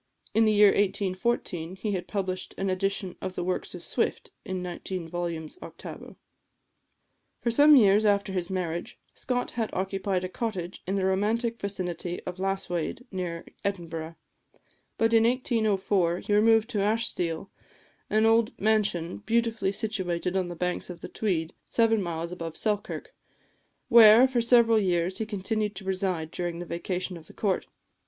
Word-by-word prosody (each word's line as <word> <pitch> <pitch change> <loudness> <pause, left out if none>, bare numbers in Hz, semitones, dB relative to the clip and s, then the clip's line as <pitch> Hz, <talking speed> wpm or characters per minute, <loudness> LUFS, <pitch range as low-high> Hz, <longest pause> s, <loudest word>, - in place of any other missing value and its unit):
In 225 +1 +4
the 215 - +4
year 210 -1 +7
1814 190 -3 -1
he 210 +2 -3
had 180 -2 -3
published 190 -3 -3
an 195 -1 0
edition 195 0 -2
of 185 -1 -4
the - - -2
works 185 +1 -2
of - - -8
Swift, - - -1
in 185 -1 -4
nineteen 180 0 -5
volumes 170 - -4
octavo. - - -9 1.2
For 235 - 0
some 290 +5 +7
years 210 -4 +6
after 200 -2 +2
his 180 -2 -2
marriage, 180 +3 -3 0.2
Scott 245 -1 -2
had 225 -2 -2
occupied 190 0 -1
a - - -1
cottage 185 -3 -4
in 190 - 0
the 195 -1 +1
romantic 225 +5 0
vicinity 180 -3 -3
of 180 0 -6
Lasswade, 195 +3 -2
near 180 -3 -4 0.2
Edinburgh; 165 -4 -4 0.8
but 225 0 +2
in 225 0 +6
1804 210 -7 +1
he 205 - -2
removed 225 +2 +4
to 210 - -1
Ashestiel, 200 -5 -1 0.6
an 215 +1 +3
old 225 0 +3
mansion, 200 -5 +1
beautifully 225 -2 0
situated 190 -5 -2
on 185 -2 +1
the 175 - -6
banks 180 +2 -2
of 170 -2 -8
the - - -7
Tweed, 175 -6 -1 0.2
seven 225 -2 +3
miles 170 -1 -3
above 165 -2 -6
Selkirk, 210 -2 -2 0.7
where, 230 +2 +8
for 255 -2 0
several 230 -1 +5
years, 180 -2 0
he 220 - -2
continued 210 +1 -2
to 195 - -8
reside 185 -4 -1
during 175 -1 -3
the 175 - -5
vacation 180 +1 -3
of 160 -2 -14
the - - -14
Court. 195 -4 -1
195 Hz, 155 wpm, -27 LUFS, 180-220 Hz, 1.2 s, where